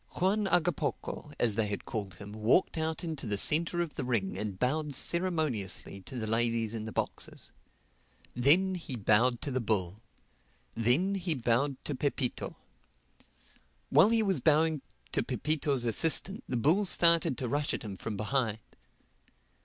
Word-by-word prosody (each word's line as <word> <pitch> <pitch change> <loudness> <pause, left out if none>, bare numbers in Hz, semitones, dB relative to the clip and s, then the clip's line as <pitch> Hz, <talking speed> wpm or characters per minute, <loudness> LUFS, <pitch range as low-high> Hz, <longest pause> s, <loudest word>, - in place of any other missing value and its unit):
Juan 200 +3 +1
Hagapoco, 175 -4 -1
as 115 -3 +2
they 105 +1 0
had 100 -1 -5
called 100 -4 -5
him, 100 +2 -10
walked 110 - +2
out 160 +1 -2
into 155 -7 -4
the 105 -1 -1
centre 165 - +4
of 170 -3 -4
the 145 - -4
ring 115 -6 -1
and 105 -3 -4
bowed 145 +5 -1
ceremoniously 155 - 0
to 125 +7 -9
the 110 - -3
ladies 115 0 0
in 110 -1 -4
the 110 - -6
boxes. - - -4 0.8
Then 165 +10 +4
he 165 -7 -4
bowed 115 +3 +2
to 145 - -3
the 130 0 -1
bull. 105 -3 -2 0.7
Then 125 - +2
he 180 -4 -1
bowed 130 +3 0
to 150 - -3
Pepito. 135 -2 -2 1.4
While 155 +9 +6
he 225 -1 +3
was 190 -7 +1
bowing 155 +1 +2 0.3
to - - +1
Pepito's 145 -5 -1
assistant 165 - +2
the 125 - -1
bull 160 - +3
started 170 -6 +4
to 125 - -3
rush 145 +4 -1
at - - -4
him 105 -3 -6
from 105 +2 -5
behind. 110 0 -1
130 Hz, 155 wpm, -30 LUFS, 110-165 Hz, 1.4 s, While